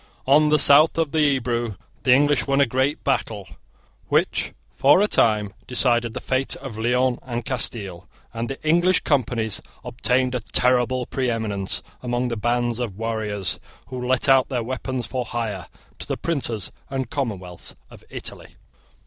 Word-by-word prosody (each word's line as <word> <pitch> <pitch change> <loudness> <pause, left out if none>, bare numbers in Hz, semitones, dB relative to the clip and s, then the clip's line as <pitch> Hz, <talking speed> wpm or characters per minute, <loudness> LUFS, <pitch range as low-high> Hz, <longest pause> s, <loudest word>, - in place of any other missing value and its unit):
On 150 +3 +5
the 150 - +5
south 150 +3 +6
of 160 -3 0
the 160 - 0 0.2
Ebro 120 -4 -2 0.2
the 130 - +2
English 145 0 +4
won 140 0 +2
a 140 - +6
great 130 +4 0
battle, 110 -7 -1 0.6
which - - +1 0.2
for 145 +6 +5
a 205 - +3
time 105 - +2
decided 120 -2 +1
the - - -2
fate 130 +1 -1
of 130 -5 -8
Leon 125 +3 +1
and 120 -3 -5
Castile; 105 -8 -2 0.3
and 115 0 -3
the 135 - -5
English 175 +3 +4
Companies 115 -6 0 0.2
obtained 125 +1 0
a 125 - 0
terrible 125 +2 +1
preeminence 110 -7 -2 0.2
among 125 0 -1
the 115 - -2
bands 120 +1 0
of 110 -6 -4
warriors 110 -4 -2 0.3
who 125 -1 -5
let 130 +1 +1
out 135 -1 +5
their 125 -4 -1
weapons 130 +1 -3
for 130 -1 -3
hire 110 -7 -4 0.3
to - - -5
the - - -2
princes 120 - -2 0.2
and 130 -2 -3
commonwealths 100 - -4 0.2
of - - -14
Italy. - - -7
125 Hz, 155 wpm, -23 LUFS, 115-135 Hz, 0.6 s, south